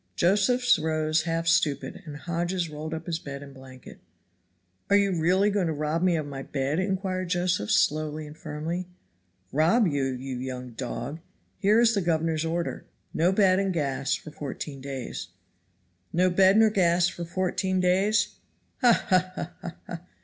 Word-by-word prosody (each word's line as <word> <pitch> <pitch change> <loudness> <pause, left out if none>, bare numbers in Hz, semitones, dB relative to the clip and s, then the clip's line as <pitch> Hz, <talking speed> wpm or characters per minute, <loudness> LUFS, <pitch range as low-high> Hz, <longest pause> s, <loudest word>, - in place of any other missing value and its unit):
Josephs 225 +6 +3
rose 155 0 +1
half 165 0 -1
stupid, 155 -3 +1
and 145 -1 -7
Hodges 175 +1 -2
rolled 155 +1 -6
up 160 0 -7
his 165 -1 -2
bed 140 -2 -7
and 140 -1 -12
blanket. 130 -1 -13 0.9
"Are 200 - +5
you 200 -1 +3
really 185 +5 +3
going 195 -3 +1
to 160 - -1
rob 155 +2 -1
me 180 -1 +3
of 155 -2 -2
my 140 -2 -6
bed?" 135 +3 -2
inquired 185 -1 -2
Josephs 175 - +1
slowly 155 0 +1
and 150 0 -11
firmly. 160 +4 -4 0.6
"Rob 170 - +3
you, 145 -6 0
you 130 0 -4
young 125 -1 -6
dog? 130 +6 -5 0.4
Here 210 +3 +4
is 235 -1 +5
the 200 - +1
governor's 165 -2 0
order. 170 +1 -2 0.3
No 170 +3 +3
bed 190 -1 +4
and 195 -1 0
gas 140 -5 -1
for 155 - -9
fourteen 140 -1 -6
days." 135 -2 -5 0.8
"No 180 +2 +2
bed 190 +2 +5
nor 220 -1 +5
gas 175 -3 +3
for 175 - -5
fourteen 185 +2 -1
days! 190 +4 +2 0.4
Ha! 240 -2 +4
ha! 185 -1 +2
ha! 175 - -5
ha! 175 - -6
ha!" 170 - -7
165 Hz, 165 wpm, -26 LUFS, 150-185 Hz, 0.9 s, Are